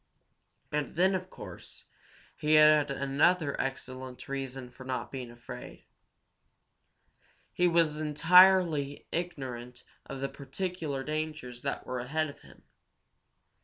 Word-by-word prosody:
And 150 -1 -2
then, 185 +3 +4
of 185 0 -3
course, - - -10 0.5
he 155 +1 +2
had 150 -1 +6
another 140 +3 +2
excellent 130 -1 -6
reason 135 -2 -5
for 130 +1 -12
not 130 -1 -4
being 130 -3 -6
afraid. 120 0 -10 1.7
He 180 - +3
was 165 -3 +3
entirely 160 -1 +5
ignorant 130 -8 -5 0.2
of 135 - -6
the 135 - -1
particular 145 0 -4
dangers 155 -5 -4
that - - -3
were 130 - -3
ahead 150 +5 -1
of - - -19
him. - - -18
145 Hz, 115 wpm, -30 LUFS, 130-160 Hz, 1.7 s, had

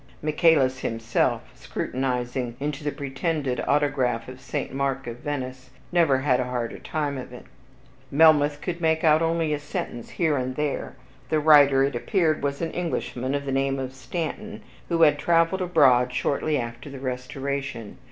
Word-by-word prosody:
Michaelis 150 -4 +3
himself, 115 -1 0
scrutinizing 125 -2 -3
into 145 +1 -3
the 145 - -1
pretended 140 -1 -2
autograph 135 -5 +1
of 130 0 -10
St. 130 - -4
Mark 135 -1 -2
at 120 0 -5
Venice, 130 -2 -5 0.2
never 165 -6 +4
had 130 -3 +2
a 125 - 0
harder 120 -2 -4
time 145 -3 -3
of 125 - -8
it. 125 - -11 0.6
Melmoth 150 0 +4
could 175 -2 -4
make 160 -1 +1
out 155 0 +5
only 165 -1 +1
a 150 - -1
sentence 120 -4 -5
here 160 -4 0
and 130 0 -2
there. 150 0 -2 0.3
The 155 - +2
writer, 145 -3 +6
it 140 -1 0
appeared, 160 - +1
was 140 +3 -2
an 165 - -2
Englishman 135 -6 -2
of 140 0 -3
the 135 - -2
name 135 0 0
of 130 -1 -4
Stanton, 170 - -5 0.3
who 165 -1 +3
had 150 -2 +5
traveled 165 +4 +2
abroad 135 -8 +4
shortly 145 +4 0
after 120 +2 -5
the 140 - -8
Restoration. 135 -2 -4
140 Hz, 160 wpm, -25 LUFS, 130-155 Hz, 0.6 s, writer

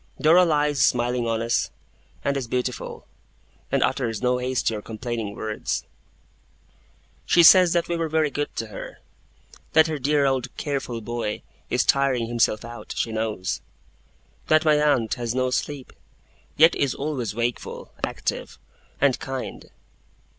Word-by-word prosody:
Dora 170 +4 +6
lies 150 -3 +2
smiling 120 0 +1
on 115 0 0
us, 115 0 0 0.6
and 140 - +1
is 135 -3 -3
beautiful, 125 +1 -3 0.7
and - - +3
utters 115 -5 -1
no 125 0 +1
hasty 125 -2 0
or 105 - -5
complaining 110 -1 -5
word. 110 -1 -6 1.6
She 170 - +6
says 180 0 +8
that 170 -1 +1
we 175 - -2
are 165 -1 -1
very 155 -1 +1
good 145 +1 -2
to 115 - -3
her; 100 - -8 0.8
that 160 0 +7
her 155 -3 -3
dear 145 +1 +2
old 130 -2 -1
careful 135 -5 -3
boy 115 -2 -4 0.3
is - - +1
tiring 135 -4 +2
himself 115 -2 +1
out, 120 -2 -8
she 115 - -1
knows; 110 -4 -2 0.9
that 155 0 +4
my 150 -1 +4
aunt 130 -7 +2
has 120 0 -2
no 130 0 +1
sleep, 140 0 -3 0.6
yet 165 +3 +7
is 140 -3 0
always 135 -7 -3
wakeful, 120 +1 -3
active, - - -3 0.4
and 140 -3 +3
kind. 135 -1 -6
125 Hz, 145 wpm, -24 LUFS, 115-150 Hz, 1.6 s, says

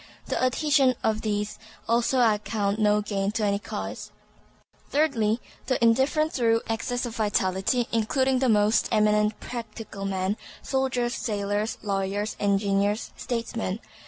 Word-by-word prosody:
The - - -1
adhesion 270 0 +3
of 220 0 +1
these 210 -1 -2 0.3
also 240 +2 +2
I 220 -3 +4
count 205 0 -1
no 210 0 +3
gain 200 -1 -1
to 220 - -1
any 200 0 +1
cause. 100 - -6 0.8
Thirdly, 250 -7 +2 0.3
the 260 - +2
indifferent 270 +7 +3
through 230 -2 +2
excess 245 +2 -2
of 235 -1 -6
vitality, 205 +2 +1
including 260 +4 +1
the 260 -1 +2
most 210 0 +3
eminent 210 -1 +2
"practical" 225 -4 -7
men, 190 +1 -1 0.3
soldiers, 260 -3 0
sailors, 205 -1 -2
lawyers, 200 +1 -1
engineers, 200 +1 +1
statesmen. 230 -4 -3
220 Hz, 130 wpm, -26 LUFS, 205-245 Hz, 0.8 s, I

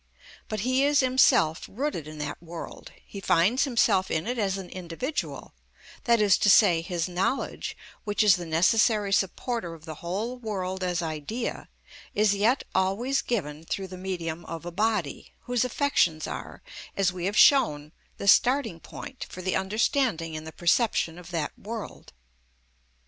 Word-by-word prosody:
But 215 -3 -2
he 255 +4 +2
is 290 0 +4
himself 255 -11 +3
rooted 235 - -3
in 155 0 -9
that 150 +1 -5
world; 170 0 -9
he 200 - -9
finds 195 - +3
himself 220 -7 +2
in 160 - -1
it 245 0 -2
as 195 -2 0
an 190 -2 -7
individual, 185 - -5 0.5
that 235 -2 +4
is 205 -3 +4
to 205 - +3
say, 185 -5 +6
his 170 0 -2
knowledge, 185 +9 -2 0.3
which 205 0 +1
is 205 -4 +6
the 175 -2 -6
necessary 200 +5 +3
supporter 195 -1 -1
of 160 0 -15
the 160 - -6
whole 215 +9 -3
world 190 -4 -3
as 180 -1 -1
idea, 160 - -4 0.5
is 210 -1 +3
yet 220 +7 +2
always 220 +9 +1
given 155 -10 -3
through 190 +3 -4
the 185 - -8
medium 175 -3 -4
of 165 0 -7
a 175 - -5
body, 210 -4 -1
whose 245 -1 0
affections 245 - +1
are, - - -7 0.3
as 190 -2 +2
we 180 -1 -4
have 205 +3 -1
shown, 150 - +5 0.3
the 200 - -5
starting 240 -4 +4
point 260 - -9
for 185 - -8
the 185 - 0
understanding 195 - 0
in 155 0 -6
the 160 - -7
perception 175 -1 +1
of 175 -1 -12
that 165 -4 -2
world. 220 +1 -7
190 Hz, 160 wpm, -27 LUFS, 170-230 Hz, 0.5 s, say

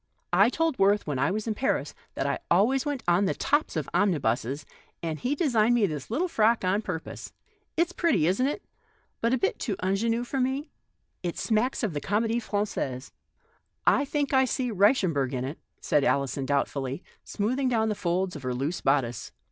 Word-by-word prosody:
I 200 +5 +6
told 325 +1 0
Worth 200 +2 +3
when 145 -4 -2
I - - +2
was 210 +3 -2
in 225 - -1
Paris 260 +5 -1 0.2
that - - -1
I - - 0
always 245 - +3
went 285 -3 -2
on 175 +3 +4
the 190 - 0
tops 290 - 0
of 155 -4 -2
omnibuses, 140 - 0 0.4
and 160 -2 -3
he 260 +4 0
designed 240 -7 +3
me 230 -4 +4
this 150 -7 -4
little 305 +12 0
frock 225 - +2
on 190 +3 +2
pur 180 -6 -3
pose. - - -9 0.5
It's 340 +1 +2
pretty, 330 - +2
isn't 195 +10 +2
it, 290 - -3 0.6
but 230 - +2
a - - +4
little - - +1
too 205 - -2
mgenue 225 +6 0
for 270 +2 -3
me? 265 +4 -1 0.5
It 175 -2 -3
smacks 240 +4 0
of 210 -7 0
the 145 - -3
Com6die 225 +7 0
Frangaise. 200 - -3 0.7
I - - +4
think 285 0 -1
I 265 0 +5
see 255 -1 -1
Reichemberg 185 - +2
in 125 0 -2
it," 140 +5 -6 0.2
said 145 - +1
Alison, 135 -1 0
doubtfully 140 +1 -1 0.2
smoothing 255 +6 -1
down 220 -2 +1
the - - +1
folds 180 -1 -1
of 150 - -7
her 130 -1 -2
loose 145 +7 -2
bodice. 130 -4 0
205 Hz, 190 wpm, -27 LUFS, 155-250 Hz, 0.7 s, I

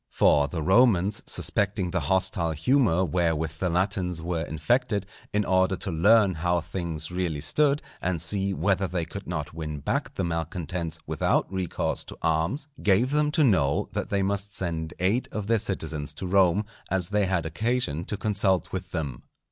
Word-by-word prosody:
For 70 -1 +4
the 80 +2 -4
Romans 100 0 +4
suspecting 100 -3 0
the 90 - 0
hostile 85 +1 0
humour 95 - +2
wherewith 80 -2 -1
the 90 - 0
Latins 90 -1 0
were 85 0 -2
infected, 105 - 0 0.3
in 105 0 +1
order 95 +1 +2
to 95 +1 -3
learn 100 +4 +5
how 85 +2 +1
things 85 -1 -4
really 90 -4 -2
stood, 140 - +2 0.2
and 90 -1 -1
see 95 +4 +1
whether 95 +1 +1
they 90 -1 -2
could - - -8
not 75 0 -4
win 80 -2 -5
back - - -2
the - - -1
malcontents 85 0 -3
without - - 0
recourse 95 -3 -2
to - - -10
arms, 85 - 0
gave 105 +6 +3
them 150 0 +2
to 155 - +3
know 85 - +2
that - - -3
they 100 -1 +1
must 100 +1 -2
send 80 -3 -3
eight 100 +8 +1
of 105 -2 -4
their 115 +1 +2
citizens 80 -8 -3
to 95 - -5
Rome, 95 +2 +3 0.2
as 95 -2 0
they 105 -1 +1
had 90 -3 0
occasion 85 -2 -1
to 105 - -3
consult 100 -4 +1
with - - -5
them. 70 -6 -3
90 Hz, 170 wpm, -26 LUFS, 80-100 Hz, 0.3 s, learn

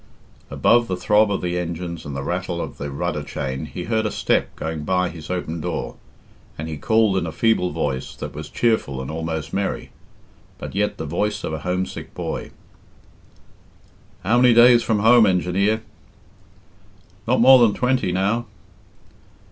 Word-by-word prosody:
Above 120 0 +3
the 90 - -2
throb 105 +3 +3
of 100 - -1
the 90 0 -1
engines 85 -1 -5
and 70 - -6
the 70 - -4
rattle 90 +2 -3
of 70 -4 -6
the 70 - -4
rudder 70 - -3
chain 65 +2 -4
he 90 - -6
heard 110 +2 0
a 105 - 0
step - - 0
going 80 -1 -4
by 90 +2 +1
his 80 -3 -10
open 85 -3 -3
door, - - -4 0.6
and 80 - -5
he 80 - -4
called 110 +4 +2
in 85 - -3
a - - -4
feeble 110 -2 +1
voice 75 -5 -3
that - - -7
was 75 0 -7
cheerful 110 - 0
and 65 +3 -5
almost 80 -1 -4
merry, 100 0 -2 0.7
but - - -7
yet 105 +2 -1
the 80 - -5
voice 105 +6 -2
of 80 - -3
a 80 - -3
homesick 90 +3 -4
boy - - -4 1.7
"How 120 +6 +3
many 125 -2 +6
days 120 0 +7
from 110 -3 0
home, 115 0 +6
engineer?" 95 +4 +1 1.4
"Not - - +2
more 130 +2 +8
than 115 -4 +4
twenty 125 -6 +1
now." 100 +6 0
90 Hz, 165 wpm, -22 LUFS, 80-110 Hz, 1.7 s, more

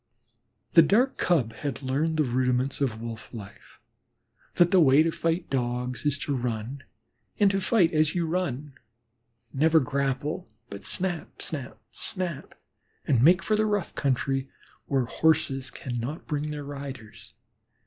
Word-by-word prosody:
The 165 - +9
Dark 235 - +3
Cub 135 -11 +1
had 140 -1 -4
learned 150 +5 0
the 155 - +4
rudiments 125 +1 0
of 120 -5 0
Wolf 115 -1 -7
life: 100 -3 -11 0.8
that 175 0 +4
the 190 - +6
way 145 -1 +6
to 165 - +1
fight 165 +2 -1
Dogs 125 0 -2
is 145 -1 +2
to 145 - -1
run, 120 +1 -3 0.6
and 205 -2 +5
to 195 0 0
fight 190 -4 +3
as 155 +1 +2
you 175 -2 +1
run, 150 -5 -2 0.8
never 160 +4 +4
grapple, 140 +4 -2 0.2
but 100 - -6
snap, 180 -3 -1
snap, 140 -5 -4
snap, 180 -6 -3 0.5
and 125 -5 +3
make 180 +7 +5
for 215 - +1
the 215 0 +2
rough 205 -4 -1
country 135 0 -1 0.4
where 135 -3 +1
Horses 135 -1 +1
cannot 125 +4 -5
bring 150 0 -2
their 150 -1 -5
riders. 130 -6 -9
145 Hz, 145 wpm, -27 LUFS, 130-165 Hz, 0.8 s, The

